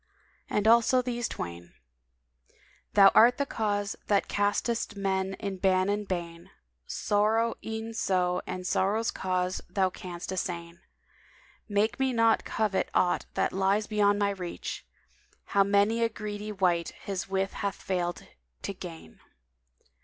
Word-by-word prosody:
And 210 +1 +1
also 235 +2 +5
these 240 -1 -2
twain, 85 0 -7 1.2
"Thou 195 -1 +9
art 240 +2 +6
the 280 - 0
cause 205 -5 -1
that 200 -1 +2
castest 205 +2 0
men 190 -1 -1
in 200 -1 -5
ban 185 0 +2
and 205 0 -1
bane; 170 -2 -5 0.2
* - - -48
Sorrow 220 +3 +1
e'en 220 +1 -5
so 180 -4 +1
and 185 0 -5
sorrow's 210 +5 +1
cause 185 0 -1
Thou 190 -2 +1
canst 180 0 -7
assain: 170 -2 -4 0.9
Make 210 +4 +1
me 265 -1 +1
not 230 -1 +3
covet 210 -3 0
aught 180 - +2
that - - +1
lies 195 +3 +2
beyond 205 -1 +2
my 200 -1 +1
reach; 180 -3 -6 0.3
* - - -35
How 200 - +6
many 205 +3 +2
a 230 - +3
greedy 210 -1 -5
wight 180 -4 +1
his 195 -1 -4
wish 195 0 0
hath 200 -1 -3
failed 175 -2 -3 0.4
to - - -3
gain!" 80 -1 -10
200 Hz, 140 wpm, -28 LUFS, 185-215 Hz, 1.2 s, Thou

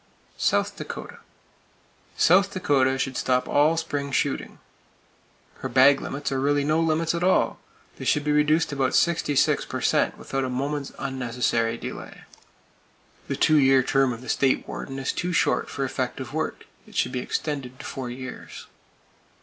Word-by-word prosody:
South - - +1
Dakota: - - -7 1.0
South 190 +3 +5
Dakota 135 -8 +2
should 135 0 -2
stop 125 0 +1
all 150 +3 +3
spring 145 -3 -3
shooting. - - -1 1.0
Her 130 - -4
game - - -13
bag 135 +1 +6
limits 140 +1 -4
are 135 - 0
really 145 +1 +2
no 155 +2 +2
limits 165 0 +1
at 170 0 -2
all! 185 +1 +2 0.4
They - - -7
should 150 - +2
be 150 - 0
reduced 150 +2 +2
about 135 -2 0
66 160 -5 +2
per - - -5
cent - - +1
without 135 0 -3
a 130 - -2
moment's 140 +2 -3
unnecessary 120 -3 -1
delay. - - -8 1.0
The - - -2
two 155 -1 +4
year 135 -2 +5
term 135 0 +2
of 115 0 -6
the 130 - -9
State 135 -2 +1
Warden 135 -1 -6
is 135 - -2
too 180 +1 -2
short - - +1
for 135 - -2
effective 130 0 -4
work. 160 0 -3 0.2
It - - -16
should - - +1
be 125 - -2
extended 130 -1 -4
to - - -9
four 130 -2 -5
years. 130 +1 -8
135 Hz, 165 wpm, -25 LUFS, 130-150 Hz, 1.0 s, bag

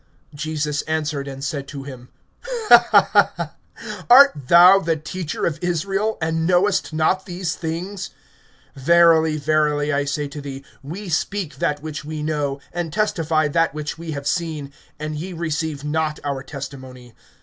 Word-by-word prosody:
(10)Jesus 150 0 -2
answered 150 -3 -2
and 135 0 -7
said 140 -1 -3
to 140 -2 -7
him: 130 -3 -10 2.0
Art 275 +3 +9
thou 175 +7 +6
the 165 -4 0
teacher 155 +2 -4
of 165 - -2
Israel, 195 +5 -1
and 160 0 -1
knowest 185 +1 +2
not 160 +4 0
these 175 -2 -3
things? 175 +4 -5 0.7
(11)Verily, 160 +1 +4
verily, 150 0 +1
I 140 0 0
say 145 +1 -2
to 145 +1 -8
thee, 135 -1 -8 0.2
we 175 +9 -7
speak 175 0 -2
that 145 0 -1
which 155 -2 -6
we 155 0 -5
know, 145 -3 -2
and 175 -2 -3
testify 165 -6 +1
that 165 0 +1
which 155 +1 -5
we 165 -2 -5
have 140 -1 -6
seen; 150 -3 -2 0.2
and 155 0 -5
ye 180 +4 -6
receive 160 -3 -3
not 155 +1 -1
our 140 -2 -3
testimony. 130 -3 -9
155 Hz, 145 wpm, -21 LUFS, 145-170 Hz, 2.0 s, Art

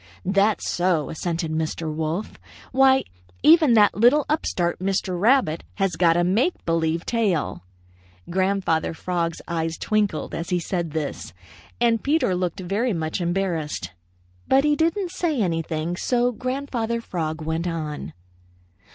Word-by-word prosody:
"'That's 200 +3 +2
so,' 175 -4 0
assented 165 0 -3
Mr. 160 0 -2
Wolf. 160 +6 -3 0.3
'Why, 265 0 +5 0.4
even 315 -5 +6
that 210 -2 +5
little 245 +7 +4
upstart, 175 - 0
Mr. 185 -1 -1
Rabbit, 225 - +3
has 195 -4 0
got 170 -1 +3
a 175 - +3
make 215 - +1
believe 165 0 0
tail.'" 210 -9 0 0.7
Grandfather 185 -3 0
Frog's 170 -1 -2
eyes 165 -1 -2
twinkled 210 -7 -1
as 165 - -4
he 180 - +1
said 170 -1 -2
this, 155 - -4 0.5
and 235 -2 +2
Peter 290 - +2
looked 180 0 -2
very 205 +6 0
much 160 +1 -2
embarrassed. 170 - -2 0.6
But 270 +1 +4
he 295 0 +3
didn't 335 +4 0
say 340 -6 -1
anything, 165 -3 -1
so 245 +5 +1
Grandfather 250 -2 -2
Frog 165 -7 -4
went 160 +2 -2
on. 155 -3 -4
185 Hz, 135 wpm, -23 LUFS, 165-235 Hz, 0.7 s, even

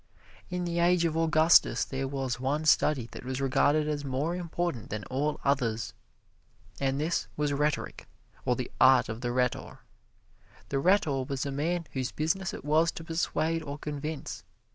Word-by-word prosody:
In 180 -1 -2
the 170 0 -1
age 175 0 +3
of 160 -1 0
Augustus 160 0 +4
there 135 0 -3
was 135 -3 -3
one 145 +4 -1
study 150 -5 +3
that - - -9
was 130 +1 -3
regarded 145 +3 +2
as 150 -1 -2
more 140 +5 -1
important 175 -7 -3
than 105 0 -4
all 145 +3 -1
others, 115 -6 0 0.9
and 135 0 0
this 160 +3 -1
was 145 -1 0
rhetoric, 150 +2 -1 0.4
or 125 - +1
the 125 0 -5
art 130 -3 +6
of 110 +2 -5
the 120 -1 -1
rhetor. 125 0 -1 0.9
The 135 - 0
rhetor 150 -6 +2
was 135 0 -3
a 140 - -2
man 165 +5 -1
whose 130 -2 -2
business 190 +5 -1
it - - -8
was 160 +3 +3
to 165 - -7
persuade 165 0 -1
or 145 -2 -6
convince. 150 0 -5
145 Hz, 165 wpm, -29 LUFS, 130-165 Hz, 0.9 s, art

